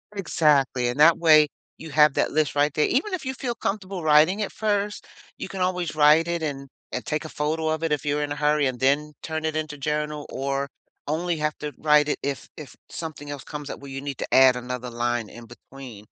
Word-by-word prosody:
Exactly, 145 Hz, -9 st, +2 dB
and 125 Hz, +4 st, -3 dB
that 165 Hz, +2 st, +7 dB
way 155 Hz, -2 st, +6 dB, 0.3 s
you 160 Hz, -1 st, -9 dB
have 150 Hz, 0 st, +5 dB
that -, -, +1 dB
list 150 Hz, -1 st, 0 dB
right 145 Hz, 0 st, +2 dB
there 150 Hz, -, +2 dB
even 340 Hz, -, 0 dB
if 345 Hz, -6 st, -3 dB
you 260 Hz, -, -2 dB
feel 255 Hz, -2 st, -3 dB
comfortable 195 Hz, -5 st, -4 dB
writing 155 Hz, +6 st, +5 dB
it 210 Hz, -, -2 dB
first, 205 Hz, -1 st, -2 dB, 0.3 s
you -, -, -5 dB
can 190 Hz, -2 st, -6 dB
always 180 Hz, -3 st, -1 dB
write 155 Hz, +2 st, +5 dB
it 170 Hz, -1 st, -2 dB
and 140 Hz, -2 st, -4 dB, 0.2 s
and 125 Hz, -, -4 dB
take 150 Hz, +1 st, -2 dB
a -, -, -6 dB
photo 155 Hz, +2 st, -2 dB
of 160 Hz, +1 st, -2 dB
it 165 Hz, -, 0 dB
if 150 Hz, -, 0 dB
you're 145 Hz, 0 st, 0 dB
in 145 Hz, -, -4 dB
a -, -, -1 dB
hurry 150 Hz, 0 st, +2 dB
and 130 Hz, -2 st, -2 dB
then 145 Hz, +3 st, +1 dB
turn 160 Hz, 0 st, -4 dB
it 155 Hz, 0 st, -1 dB
into 155 Hz, -1 st, -3 dB
journal 150 Hz, +1 st, -3 dB
or 140 Hz, +1 st, -2 dB, 0.4 s
only 170 Hz, +3 st, -1 dB
have 150 Hz, 0 st, -1 dB
to 150 Hz, -1 st, -4 dB
write 150 Hz, -1 st, +4 dB
it -, -, 0 dB
if 140 Hz, -1 st, -3 dB
if 145 Hz, -5 st, -10 dB
something 155 Hz, -3 st, -7 dB
else 145 Hz, -2 st, -6 dB
comes 145 Hz, -2 st, -7 dB
up -, -, -6 dB
where 140 Hz, -1 st, -10 dB
you 135 Hz, 0 st, -5 dB
need 140 Hz, -2 st, -5 dB
to -, -, -5 dB
add 130 Hz, -1 st, +7 dB
another 125 Hz, 0 st, -5 dB
line 120 Hz, -1 st, -2 dB
in 120 Hz, 0 st, -12 dB
between. 120 Hz, -2 st, -12 dB
150 Hz, 230 wpm, -24 LUFS, 140-160 Hz, 0.4 s, that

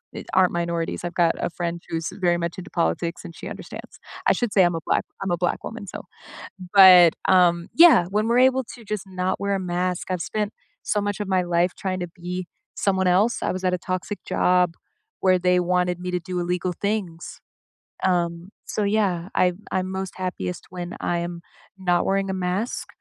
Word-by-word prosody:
e -, -, -6 dB
aren't 185 Hz, -1 st, +4 dB
minorities, 170 Hz, -1 st, -2 dB
I've 175 Hz, 0 st, -4 dB
got 170 Hz, -2 st, +3 dB
a -, -, -1 dB
friend 170 Hz, 0 st, -4 dB
who's 165 Hz, -1 st, -2 dB
very 180 Hz, -3 st, +1 dB
much 170 Hz, 0 st, -3 dB
into 180 Hz, -, -8 dB
politics, 165 Hz, -, -1 dB
and 170 Hz, -, -9 dB
she -, -, -8 dB
understands. -, -, -10 dB, 0.3 s
I -, -, +6 dB
should 240 Hz, -4 st, -2 dB
say 190 Hz, -, +6 dB
I'm 175 Hz, 0 st, +2 dB
a -, -, -2 dB
black -, -, +1 dB, 0.2 s
I'm 195 Hz, -, -2 dB
a 175 Hz, -, +1 dB
black 175 Hz, +1 st, -1 dB
woman, 220 Hz, -2 st, -7 dB
so -, -, -7 dB, 0.7 s
but, 180 Hz, -4 st, +9 dB
um, 175 Hz, -2 st, +4 dB
yeah, 325 Hz, -, +7 dB
when 215 Hz, +3 st, 0 dB
we're 235 Hz, -, +3 dB
able 260 Hz, 0 st, +1 dB
to 235 Hz, -, -13 dB
just 210 Hz, -1 st, -4 dB
not 185 Hz, 0 st, -2 dB
wear 200 Hz, 0 st, 0 dB
a -, -, -3 dB
mask, 180 Hz, 0 st, -2 dB
I've 180 Hz, -2 st, -1 dB
spent 210 Hz, +3 st, -2 dB, 0.3 s
so 210 Hz, -, 0 dB
much 205 Hz, 0 st, -3 dB
of 205 Hz, -, -3 dB
my 185 Hz, -1 st, +2 dB
life 175 Hz, 0 st, +1 dB
trying 185 Hz, -1 st, -3 dB
to 175 Hz, -, -2 dB
be 180 Hz, +1 st, -6 dB, 0.3 s
someone 190 Hz, -2 st, +1 dB
else. 195 Hz, +7 st, +3 dB
I -, -, 0 dB
was 185 Hz, -, -5 dB
at 180 Hz, 0 st, +2 dB
a -, -, -1 dB
toxic 185 Hz, +3 st, -4 dB
job 180 Hz, -1 st, +2 dB, 0.5 s
where 185 Hz, -1 st, +4 dB
they 180 Hz, 0 st, +3 dB
wanted 180 Hz, 0 st, 0 dB
me 180 Hz, 0 st, -4 dB
to 180 Hz, -, +1 dB
do 180 Hz, +1 st, -4 dB
illegal 180 Hz, +1 st, -1 dB
things. 200 Hz, -5 st, -3 dB, 0.6 s
Um, 175 Hz, -1 st, 0 dB, 0.2 s
so, 210 Hz, -, -2 dB
yeah, 200 Hz, -4 st, 0 dB
I'm 180 Hz, 0 st, +2 dB
I'm 185 Hz, 0 st, -1 dB
most 190 Hz, 0 st, -4 dB
happiest 175 Hz, -, -4 dB
when 175 Hz, 0 st, -6 dB
I 175 Hz, -, 0 dB
am 170 Hz, 0 st, -5 dB, 0.4 s
not 180 Hz, -2 st, +1 dB
wearing 195 Hz, 0 st, +1 dB
a -, -, -1 dB
mask, 185 Hz, +5 st, -2 dB
180 Hz, 205 wpm, -23 LUFS, 175-190 Hz, 0.7 s, but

